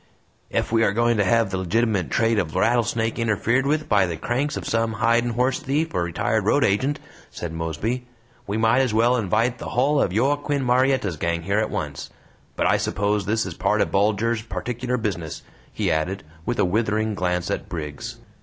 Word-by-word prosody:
"Ef - - -1
we 115 0 +3
are 100 - +2
going 120 +2 +2
to 100 - +3
hev 110 +1 +2
the 95 - -1
legitimate 100 0 0
trade 115 -1 +2
of 85 -4 -3
Rattlesnake 115 +2 +1
interfered 115 +4 +1
with 155 +1 0
by 100 -3 +3
the 85 -2 -4
cranks 135 - -1
of - - -5
some 115 0 0
hidin' 115 +2 +2
horse 125 +2 +1
thief 150 +5 -1
or 90 - 0
retired 85 -1 0
road - - +3
agent," 130 +9 +1 0.3
said 85 -2 -6
Mosby, 85 - -3 0.4
"we 100 +2 -1
might 115 +3 +3
as 130 -5 +1
well 120 +3 +4
invite 115 +2 0
the - - -6
hull 140 +4 +2
of - - +1
Joaquin 140 +5 +1
Murietta's 125 - +2
gang 85 +1 -1
here 100 +4 +1
at 110 - 0
once! - - -4 0.5
But - - 0
I - - +4
suppose 105 0 -1
this 110 +1 +1
is - - -5
part - - 0
o' - - +4
Bulger's 110 +3 +1
particular 120 +5 -3
'business,'" 90 -9 -4 0.3
he - - -1
added, 90 +6 -1 0.2
with 120 - -1
a - - +3
withering 110 +2 0
glance 90 -3 -1
at - - -3
Briggs. 75 -4 -5
110 Hz, 190 wpm, -23 LUFS, 95-120 Hz, 0.5 s, well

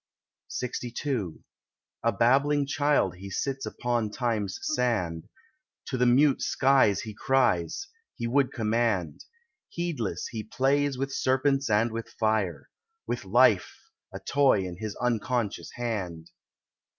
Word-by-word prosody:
LXII 125 - -3 0.6
A 115 - +2
babbling 140 +7 +3
child 145 - +1
he 100 +1 -8
sits 135 +7 -3
upon 120 -3 -1
Time's 105 -4 -2
sand, 110 - -1 0.6
To - - -4
the 125 - +4
mute 135 +3 +4
sky 135 -5 +4
he 110 +3 -5
cries, 130 - +1 0.3
he 115 - -4
would 130 +3 +2
command; 110 - -1 0.4
Heedless 140 - -3
he 110 -2 -4
plays 140 +4 +1
with 135 +1 -3
serpents 135 +1 +1
and 110 +2 +2
with 115 0 -5
fire, 110 -5 -1 0.3
With - - -3
life—a 445 - +1
toy 140 -7 +3
in 90 -1 -6
his 110 0 -5
unconscious 120 -2 -1
hand. 95 -9 -4
120 Hz, 115 wpm, -27 LUFS, 105-135 Hz, 0.6 s, the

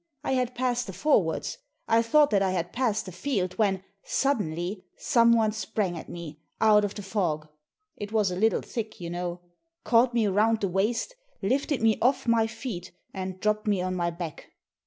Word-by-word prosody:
I - - -1
had 250 -1 0
passed 245 -1 0
the 190 - -6
forwards; 215 - +1 0.3
I 225 0 +4
thought 290 +5 +4
that 200 -2 +3
I 195 - +2
had 175 -2 -2
passed 230 -4 0
the 185 - -7
field, 185 -2 -2
when, 195 -3 +2 0.2
suddenly, 185 - -1
someone 235 -4 +4
sprang 210 -3 -2
at 165 - -8
me, 155 -3 -8 0.2
out 210 -1 +5
of 205 -1 -2
the 205 - -6
fog 175 -7 -1 0.3
— 425 - -53
it 205 0 -6
was 210 -4 +2
a - - -2
little 220 +4 +2
thick, 220 -2 -5
you 170 -1 -5
know 175 0 -4 0.2
— 330 0 -54
caught 240 +1 +3
me 230 -2 +3
round 215 +3 +2
the 200 - +1
waist, 215 - 0 0.3
lifted 275 -1 0
me 220 -1 +3
off 255 +1 +2
my 230 -1 +3
feet, 215 -6 -6 0.2
and 185 -1 -5
dropped 215 +2 0
me 205 -3 +2
on 185 0 -1
my 175 -1 0
back. 170 -2 -7
210 Hz, 195 wpm, -27 LUFS, 185-235 Hz, 0.3 s, out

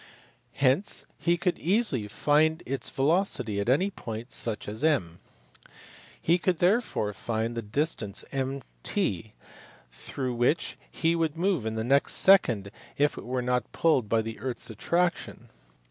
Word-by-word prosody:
Hence 140 +8 +1
he 170 0 +2
could 180 +1 -1
easily 180 - +1
find 155 +8 +2
its 135 -1 -3
velocity 135 - +1
at 100 - -1
any 185 +10 +2
point 115 - -7
such 115 -3 -2
as 110 +6 -4
M. 90 - +1 1.0
He 170 +2 +2
could 180 0 +1
therefore 175 - +1
find 115 +2 -2
the 115 - -3
distance 110 -3 -1
MT 135 - -3 0.6
through 130 - -4
which 120 +7 +1 0.3
it 165 +1 +4
would 160 -1 0
move 175 - 0
in 110 - -3
the 110 - -2
next 140 +4 +2
second 120 - +4 0.3
if 145 +1 +2
it - - -8
were 125 +1 -2
not 125 0 -1
pulled 135 -10 +2
by 115 0 +2
the 115 0 -6
earth 125 +2 -3
s - - -3
attraction. 175 - -1
130 Hz, 145 wpm, -27 LUFS, 110-165 Hz, 1.0 s, it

